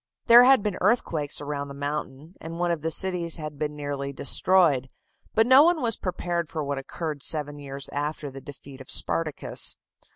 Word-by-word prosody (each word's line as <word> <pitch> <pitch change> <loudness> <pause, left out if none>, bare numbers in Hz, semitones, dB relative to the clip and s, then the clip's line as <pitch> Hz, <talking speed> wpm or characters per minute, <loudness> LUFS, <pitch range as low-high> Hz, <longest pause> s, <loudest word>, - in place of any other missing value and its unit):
There 240 +1 +8
had 265 -5 +5
been 205 -3 -3
earthquakes 170 - 0
around 145 -1 -4
the 140 - -10
mountain, 145 +2 -5
and 165 +1 -7
one 175 0 0
of 165 -3 -2
the 160 - -2
cities 175 0 +1
had 150 -2 -8
been 150 -1 -3
nearly 145 -1 -5
destroyed; 140 -2 +3 0.5
but 225 - +4
no 260 +3 +7
one 340 +1 +3
was 230 -5 0
prepared 175 -3 -3
for 155 -2 -4
what 140 -1 -3
occurred 150 +1 -6
seven 145 -1 0
years 140 -1 -6
after 145 0 -4
the 135 +1 -10
defeat 140 -1 -12
of 130 - -13
Spartacus. 155 -3 +1
150 Hz, 185 wpm, -25 LUFS, 140-180 Hz, 0.5 s, There